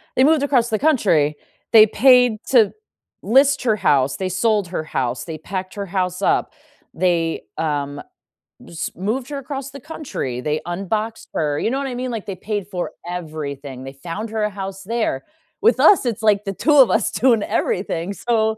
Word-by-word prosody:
they 260 Hz, -, +4 dB
moved 300 Hz, -1 st, +4 dB
across 250 Hz, -4 st, +2 dB
the 215 Hz, -, 0 dB
country. 180 Hz, -, +2 dB, 0.3 s
They 220 Hz, -2 st, +9 dB
paid 245 Hz, -1 st, +4 dB
to 230 Hz, -6 st, +4 dB, 0.5 s
list 270 Hz, +5 st, +3 dB
her 220 Hz, -4 st, +2 dB
house. 135 Hz, -6 st, +2 dB
They 185 Hz, -1 st, -2 dB
sold 205 Hz, 0 st, +1 dB
her 170 Hz, -3 st, -3 dB
house. 125 Hz, -5 st, -2 dB
They 160 Hz, -2 st, -6 dB
packed 185 Hz, +4 st, -6 dB
her 200 Hz, -1 st, -4 dB
house 185 Hz, 0 st, -2 dB
up. -, -, +1 dB, 0.4 s
They, 165 Hz, -2 st, 0 dB
um, 145 Hz, -2 st, -2 dB, 0.6 s
just 165 Hz, -, -6 dB
moved 235 Hz, +8 st, -2 dB
her 285 Hz, -, -4 dB
across 275 Hz, 0 st, -6 dB
the 280 Hz, -, -9 dB
country. 255 Hz, -, -5 dB
They 150 Hz, +2 st, -1 dB
unboxed 210 Hz, +5 st, -3 dB
her. 145 Hz, -2 st, 0 dB
You 225 Hz, -, -1 dB
know 270 Hz, -, 0 dB
what 275 Hz, 0 st, -2 dB
I 250 Hz, -, -5 dB
mean, 250 Hz, 0 st, -3 dB
like, 225 Hz, -3 st, -5 dB
they 195 Hz, -, -5 dB
paid 205 Hz, 0 st, -4 dB
for 180 Hz, -3 st, -4 dB, 0.2 s
everything. 145 Hz, -6 st, -6 dB
They 135 Hz, -, -8 dB
found 175 Hz, +10 st, -6 dB
her 220 Hz, -1 st, -1 dB
a 210 Hz, -, +1 dB
house 195 Hz, -1 st, -7 dB
there. 220 Hz, -, -2 dB, 0.4 s
With 455 Hz, -, +4 dB
us, 375 Hz, -10 st, +6 dB
it's 230 Hz, -1 st, -2 dB
like 210 Hz, -2 st, +3 dB
the 195 Hz, -1 st, -4 dB
2 300 Hz, -, +1 dB
of 265 Hz, -4 st, +7 dB
us -, -, +2 dB
doing 235 Hz, -4 st, +3 dB
everything. 180 Hz, -1 st, -1 dB
So, 220 Hz, -1 st, 0 dB
205 Hz, 185 wpm, -20 LUFS, 165-240 Hz, 0.6 s, They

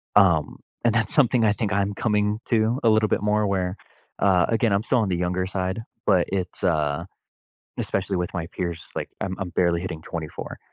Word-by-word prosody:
Um, 90 Hz, -7 st, +4 dB, 0.3 s
and 115 Hz, -2 st, +3 dB
that's 110 Hz, -4 st, +1 dB
something 125 Hz, -4 st, +4 dB
I 105 Hz, -, +4 dB
think 105 Hz, -1 st, -1 dB
I'm 100 Hz, +1 st, +1 dB
coming 105 Hz, -1 st, 0 dB
to 115 Hz, +2 st, +2 dB
a 115 Hz, -, +5 dB
little 110 Hz, 0 st, +3 dB
bit -, -, +1 dB
more 105 Hz, 0 st, +2 dB
where, 95 Hz, -2 st, 0 dB, 0.4 s
uh, 90 Hz, -3 st, +4 dB
again, 115 Hz, -1 st, +2 dB
I'm 100 Hz, +2 st, +1 dB
still 125 Hz, +2 st, +2 dB
on 105 Hz, -4 st, +1 dB
the 90 Hz, -, 0 dB
younger 90 Hz, +1 st, 0 dB
side, 95 Hz, +2 st, -2 dB, 0.2 s
but 95 Hz, -4 st, +3 dB
it's, 95 Hz, -2 st, -3 dB
uh, 75 Hz, -1 st, +1 dB, 0.7 s
especially 95 Hz, 0 st, -1 dB
with 90 Hz, 0 st, -3 dB
my 85 Hz, -3 st, -3 dB
peers, 85 Hz, -2 st, -4 dB
it's -, -, -18 dB
like, -, -, -3 dB
I'm 95 Hz, -1 st, -2 dB
I'm 95 Hz, -2 st, -3 dB
barely 85 Hz, 0 st, +1 dB
hitting 85 Hz, -4 st, -5 dB
24. 80 Hz, -1 st, -6 dB
95 Hz, 200 wpm, -24 LUFS, 90-105 Hz, 0.7 s, a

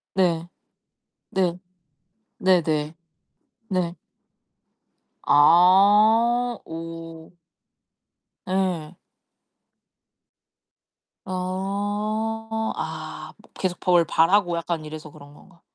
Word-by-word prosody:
네. 170 Hz, -3 st, +1 dB, 0.8 s
네. 180 Hz, -2 st, 0 dB, 0.8 s
네네. 160 Hz, -4 st, +1 dB, 0.8 s
네. 180 Hz, -2 st, -1 dB, 1.3 s
아 210 Hz, +9 st, +5 dB
오. 165 Hz, 0 st, -9 dB, 1.1 s
예. 185 Hz, -3 st, -2 dB, 2.3 s
어. 205 Hz, +4 st, -3 dB
아 -, -, -6 dB, 0.2 s
계속 180 Hz, -2 st, -3 dB
법을 175 Hz, -2 st, +3 dB
바라고 175 Hz, +2 st, +2 dB
약간 170 Hz, -1 st, -3 dB
이래서 155 Hz, 0 st, -9 dB
그런 145 Hz, -1 st, -15 dB
건가? 170 Hz, +2 st, -20 dB
180 Hz, 100 characters per minute, -23 LUFS, 165-200 Hz, 2.3 s, 아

